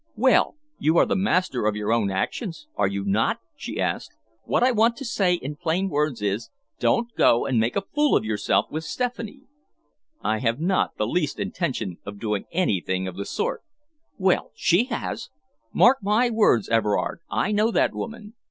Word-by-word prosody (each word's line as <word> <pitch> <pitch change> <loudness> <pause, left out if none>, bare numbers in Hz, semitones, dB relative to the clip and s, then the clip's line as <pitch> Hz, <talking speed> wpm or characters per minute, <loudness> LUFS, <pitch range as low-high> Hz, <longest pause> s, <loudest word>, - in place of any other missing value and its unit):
"Well, 255 +6 +3 0.2
you 160 +2 +2
are - - +6
the - - 0
master 185 - +1
of 105 - +1
your 105 +1 0
own 110 -4 +1
actions, 165 - -3
are - - +2
you 100 0 -3
not?" 105 +3 +1 0.2
she - - -6
asked. - - -2 0.3
"What - - +1
I 255 - +5
want 230 0 +3
to 275 - -6
say 195 -6 +2
in 150 -3 -6
plain 175 +4 0
words 145 - -1
is, 105 +3 -1 0.3
don't 230 - +1
go 120 - +4
and 125 -4 +1
make 115 +2 0
a 200 - 0
fool 295 0 +3
of - - -3
yourself 110 -1 0
with 155 +1 -3
Stephanie." 245 - -4 0.8
"I 110 - 0
have 115 +1 0
not 185 +4 0
the 105 - 0
least 150 +5 -1
intention 115 - -3
of 100 0 -8
doing 105 -2 -2
anything 95 - 0
of 95 - -6
the 100 +1 -5
sort." - - -2 0.6
"Well, 190 -2 +1
she 175 +9 +3
has! 115 - -4 0.4
Mark 260 +2 +5
my 215 +5 +2
words, 210 - +3
Everard, 115 +3 0
I 205 - 0
know 210 +2 +3
that - - +2
woman. 220 -2 -7
155 Hz, 180 wpm, -24 LUFS, -, 0.8 s, are